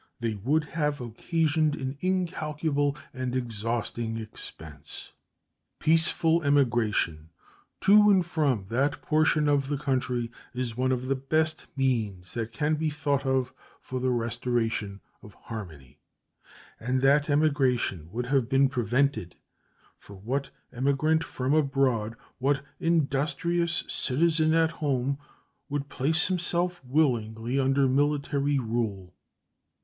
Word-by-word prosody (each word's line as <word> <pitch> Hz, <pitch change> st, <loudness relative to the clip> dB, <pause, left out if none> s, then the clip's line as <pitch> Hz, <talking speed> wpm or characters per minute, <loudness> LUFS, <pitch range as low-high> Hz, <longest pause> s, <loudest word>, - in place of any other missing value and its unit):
They 115 Hz, -2 st, -1 dB
would 135 Hz, +10 st, 0 dB
have 150 Hz, -1 st, -2 dB
occasioned 155 Hz, +5 st, 0 dB
an 130 Hz, 0 st, -4 dB
incalculable 155 Hz, -5 st, -1 dB, 0.2 s
and 130 Hz, -1 st, -3 dB
exhausting 115 Hz, -1 st, -2 dB
expense. 80 Hz, -9 st, -9 dB, 0.7 s
Peaceful 165 Hz, +1 st, +3 dB
emigration 115 Hz, -, +1 dB, 0.5 s
to 210 Hz, +1 st, +6 dB
and 190 Hz, -3 st, +4 dB
from 145 Hz, -, 0 dB
that 140 Hz, +5 st, 0 dB
portion 155 Hz, -1 st, +2 dB
of 140 Hz, -2 st, +2 dB
the 145 Hz, 0 st, -1 dB
country 125 Hz, -4 st, -1 dB, 0.2 s
is 125 Hz, -3 st, -2 dB
one 130 Hz, +1 st, +1 dB
of 130 Hz, 0 st, -1 dB
the 135 Hz, -, +1 dB
best 155 Hz, +4 st, 0 dB
means 110 Hz, -9 st, -1 dB
that 115 Hz, -1 st, -3 dB
can 150 Hz, +4 st, 0 dB
be 155 Hz, +1 st, 0 dB
thought 140 Hz, -2 st, -1 dB
of 130 Hz, -1 st, 0 dB, 0.3 s
for 130 Hz, -, -5 dB
the 130 Hz, +1 st, 0 dB
restoration 115 Hz, -4 st, -1 dB, 0.2 s
of 105 Hz, -, -14 dB
harmony, 80 Hz, -, -9 dB, 0.8 s
and 125 Hz, +3 st, -1 dB
that 145 Hz, +2 st, +4 dB
emigration 135 Hz, -, +1 dB
would 120 Hz, +4 st, -3 dB
have 130 Hz, -2 st, +1 dB
been 135 Hz, 0 st, +4 dB
prevented; 125 Hz, -4 st, 0 dB, 0.6 s
for 100 Hz, -, -13 dB
what 130 Hz, +8 st, -3 dB, 0.2 s
emigrant 140 Hz, +5 st, +1 dB
from 130 Hz, -3 st, -2 dB
abroad, 135 Hz, -7 st, +1 dB, 0.2 s
what 140 Hz, +1 st, 0 dB
industrious 170 Hz, +2 st, +1 dB
citizen 155 Hz, +3 st, +2 dB
at 165 Hz, 0 st, +3 dB
home, 140 Hz, -3 st, -1 dB, 0.5 s
would 145 Hz, 0 st, -3 dB
place 155 Hz, +5 st, +2 dB
himself 180 Hz, -2 st, -1 dB
willingly 125 Hz, -3 st, 0 dB
under 135 Hz, 0 st, +3 dB
military 145 Hz, +1 st, +1 dB
rule? 110 Hz, -7 st, -2 dB
135 Hz, 120 wpm, -27 LUFS, 120-150 Hz, 0.8 s, to